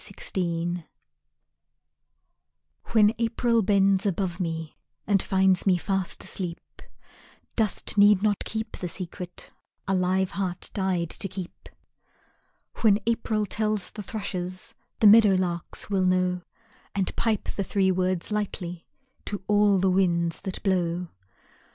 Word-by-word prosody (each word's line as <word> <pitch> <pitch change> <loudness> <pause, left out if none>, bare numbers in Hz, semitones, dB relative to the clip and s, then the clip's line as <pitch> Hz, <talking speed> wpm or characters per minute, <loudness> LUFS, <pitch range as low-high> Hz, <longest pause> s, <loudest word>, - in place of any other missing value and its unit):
"I - - -6
Love - - -5
You" 170 0 -2 2.0
When 215 -1 +4
April 230 0 +2
bends 195 -1 +3
above 185 -1 -2
me 165 -3 -3 0.3
And 200 -2 +3
finds 190 0 +2
me 185 -2 +5
fast 190 0 -2
asleep, 175 -3 -4 1.0
Dust 215 -1 0
need 205 -1 +6
not 210 -2 +1
keep 220 +1 -5
the 180 - -4
secret 180 +1 -7 0.4
A 195 - +1
live 185 0 +1
heart 185 -2 -4
died 185 -4 -1
to 200 - -4
keep. 185 -1 -8 1.1
When 210 -3 +4
April 225 -2 0
tells 215 0 -2
the 210 - -7
thrushes, 185 -3 -4 0.3
The - - +5
meadow 210 -2 +8
larks 175 +2 -2
will 190 -2 +2
know, 185 0 +1 0.5
And 195 -2 0
pipe 220 -3 0
the 200 - -2
three 190 0 +2
words 185 +1 -1
lightly 180 -5 -4 0.4
To 205 -2 -4
all 205 -1 +4
the 190 0 +2
winds 170 -3 +1
that 190 -2 -6
blow. 180 -3 0
190 Hz, 130 wpm, -26 LUFS, 180-205 Hz, 2.0 s, meadow